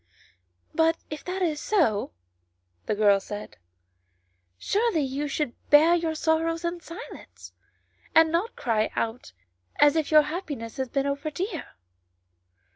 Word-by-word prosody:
" 90 0 -45
But 325 0 +3
if 305 - -6
that 370 +1 -2
is 310 -4 -1
so," 305 - +1 0.8
the - - 0
girl 205 -1 +4
said, 205 - -8 0.5
" 90 0 -45 0.2
surely 420 - +1
you 275 +2 -2
should 280 -3 -2 0.2
bear 310 +3 +7
your 330 -2 0
sorrows 330 +1 0
in 340 +1 -2
silence, 335 +1 -11 0.6
and 320 0 +6
not 350 +7 -1
cry 220 -3 0
out 230 +2 -3 0.5
as 290 0 +6
if 315 -2 0
your 305 -1 +7
happiness 290 - -5
had 260 -2 -3
been 275 -1 0
over 280 +2 -2
dear." 350 +3 -5
300 Hz, 140 wpm, -26 LUFS, 230-330 Hz, 0.8 s, bear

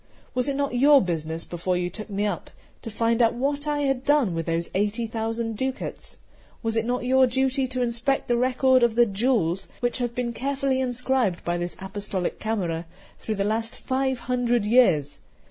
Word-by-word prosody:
Was 250 +2 +1
it 275 - -1
not 280 -2 -1
your 280 +3 +6
business, 165 -4 -3
before 180 +1 -2
you 180 0 -2
took 215 0 -8
me 205 +1 -1
up, 200 -5 -3 0.3
to - - -6
find 230 +2 +1
out 230 0 +3
what 285 +4 -1
I 295 -1 0
had 270 -2 0
done 285 - +3
with 165 -1 -3
those 165 0 -1
eighty 210 +4 0
thousand 225 0 -3
ducats? 260 +2 -4 0.5
Was 225 0 -1
it 225 0 +1
not 245 +1 -1
your 260 +1 +5
duty 265 +1 +1
to 255 0 -1
inspect 240 +3 0
the 240 - +2
record 255 +1 +3
of 235 -2 +3
the 240 0 +6
jewels, 195 -4 0
which 245 +1 -1
have 240 -1 -2
been 240 -1 -2
carefully 270 +1 -1
inscribed 250 -6 0
by 175 0 -1
this 175 0 -4
Apostolic 190 -1 -3
Camera 175 -7 -2 0.3
through 220 - -3
the 200 - 0
last 225 +2 -1
five 265 -1 -1
hundred 245 -3 0
years? 185 - +3
235 Hz, 190 wpm, -25 LUFS, 200-260 Hz, 0.5 s, your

